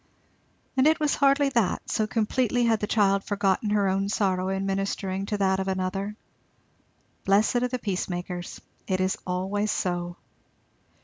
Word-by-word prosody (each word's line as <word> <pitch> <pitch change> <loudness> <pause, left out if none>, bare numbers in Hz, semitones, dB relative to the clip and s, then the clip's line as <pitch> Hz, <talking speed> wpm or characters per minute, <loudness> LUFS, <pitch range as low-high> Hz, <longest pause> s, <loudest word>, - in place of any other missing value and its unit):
And 265 +2 +4
it 315 +1 +3
was 300 -2 +1
hardly 280 0 +3
that, 235 -8 0
so 215 - 0
completely 240 +2 +1
had 225 -2 +3
the 210 - -2
child 200 -3 +2
forgotten 200 0 0
her 205 -1 +2
own 195 +1 0
sorrow 190 -3 0
in 195 0 -1
ministering 195 0 -2
to 210 - -1
that 190 -1 +2
of 190 - -2
another. 190 +2 -2 1.1
"Blessed 205 +5 +3
are 250 +1 +1
the 255 +1 -3
peacemakers"! 180 -4 -4 0.3
It 185 -1 0
is 185 0 +1
always 190 +4 -1
so. 175 -3 -2
195 Hz, 150 wpm, -26 LUFS, 190-220 Hz, 1.1 s, And